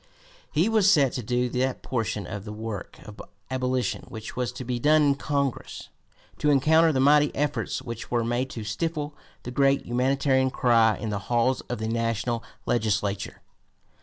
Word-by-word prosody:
He 160 +7 +2
was 215 -3 +4
set 145 -9 +4
to 125 - -3
do 125 +2 0
that 130 +1 -1
portion 110 -5 -2
of 100 +1 -6
the 105 - -7
work 105 -2 -6
of 105 -1 -10 0.3
abolition 130 -1 -1
which 110 -1 -8
was 125 -1 -1
to 130 - -7
be 120 0 -2
done 150 +4 +4
in 140 -1 +4
Congress, 140 -1 -3 0.5
to 150 - +2
encounter 160 +4 +4
the 135 - 0
mighty 145 +2 +5
efforts 145 -2 -2
which 115 -3 -7
were 120 -1 +1
made 120 +3 -1
to 115 -4 -6
stifle 150 +7 -3 0.3
the 125 - -6
great 135 +1 +2
humanitarian 130 +2 +2
cry 115 -4 +3
in 110 - -4
the 100 - -2
halls 120 +2 +2
of 125 - -2
the 110 +1 -3
national 115 +1 -1 0.2
legislature. 105 -3 -1
125 Hz, 170 wpm, -26 LUFS, 115-140 Hz, 0.5 s, mighty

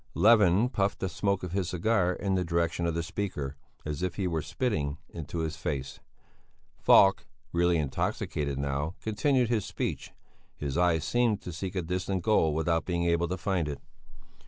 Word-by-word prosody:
Levin 105 -1 +5
puffed 100 -5 0
the 95 - -2
smoke 100 +3 -1
of 90 - -4
his 95 -2 -1
cigar 90 0 +1
in 95 +1 -2
the 95 -1 +1
direction 85 0 0
of 85 - -1
the 85 - -1
speaker, 75 -6 -4 0.3
as 75 +1 -3
if 90 -2 -2
he 95 - -2
were 80 -3 0
spitting 75 - -2
in 80 -3 -7
his 80 -2 -2
face. 70 -4 -4 0.8
Falk, 95 0 +5 0.3
really 85 0 +3
intoxicated 70 -1 -2
now, 70 +5 -2
continued 125 +2 +1
his 115 -4 +1
speech; - - -4 0.5
his 70 -2 -3
eyes 85 -2 +2
seemed 115 +3 +1
to 90 - -7
seek 95 +3 -5
a 90 - -1
distant 90 +2 -2
goal 80 -8 +3
without 80 +1 +1
being 85 -1 -1
able 85 0 +2
to 90 +2 -3
find 90 -3 -1
it. 75 - -4
85 Hz, 175 wpm, -29 LUFS, 80-95 Hz, 0.8 s, Levin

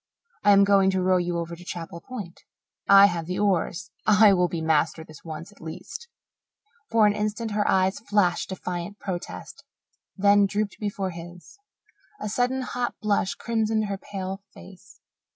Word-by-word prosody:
"I 205 - +4
am 200 0 +6
going 195 -1 +4
to 190 -1 0
row 185 0 +3
you 175 -1 -1
over 170 0 -4
to 175 - -13
Chapel 170 -2 -7
Point. 205 -8 -8 0.5
I 200 0 +9
have 170 -4 -1
the 180 - -3
oars 190 -2 0 0.2
I 210 -1 +7
will 180 -1 +3
be 170 0 -4
master 160 0 +1
this 155 -2 -15
once, 165 +3 -8
at 205 - -20
least." 160 - -8 0.8
For 225 -2 +4
an 205 - +4
instant 215 +2 -2
her 205 0 0
eyes 190 +1 +2
flashed 205 -5 +1
defiant 180 +1 -5
protest, 185 -4 -7 0.5
then 200 0 +5
drooped 205 +1 -2
before 200 -2 -3
his. 175 - -11 0.6
A 210 - -4
sudden, 250 +4 0
hot 245 -1 -3
blush 205 -3 0
crimsoned 220 -2 0
her 200 -1 -4
pale 195 -1 -6
face. 190 -2 -15
195 Hz, 165 wpm, -25 LUFS, 175-210 Hz, 0.8 s, I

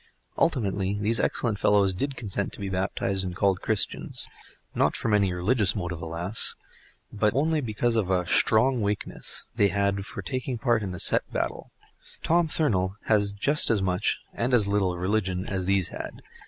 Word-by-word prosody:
Ultimately, 100 - 0
these 110 +3 +1
excellent 110 -4 -1
fellows 100 -2 +3
did 140 +9 -3
consent 100 -3 -3
to - - -11
be 100 -1 -4
baptised 95 0 -1
and 90 -1 -5
called 95 -1 +1
Christians—not 110 -2 -1
from 110 - -1
any 100 -3 +3
religious 100 +4 +1
motive, 85 -4 -4
alas! 85 +6 +1 0.6
but 105 0 +1
only 155 +2 +1
because 115 0 -1
of 105 -5 0
a 90 -2 +1
"shtrong 120 +8 +3
wakeness" 105 0 -3
they 105 -3 +4
had 100 0 0
for - - -7
taking 130 -1 -3
part 120 -2 +1
in 95 -3 -4
a - - -8
set - - +3
battle. - - -3 0.5
Tom 170 0 +2
Thurnal 100 - 0
has 105 -2 +2
just 140 +10 +2
as 105 -4 +2
much, 95 +1 0 0.2
and 125 +2 +1
as 105 -4 +3
little, 100 -3 0
religion 95 0 -1
as 95 -2 -3
these 95 -2 +2
had. - - -8
100 Hz, 165 wpm, -26 LUFS, 95-115 Hz, 0.6 s, they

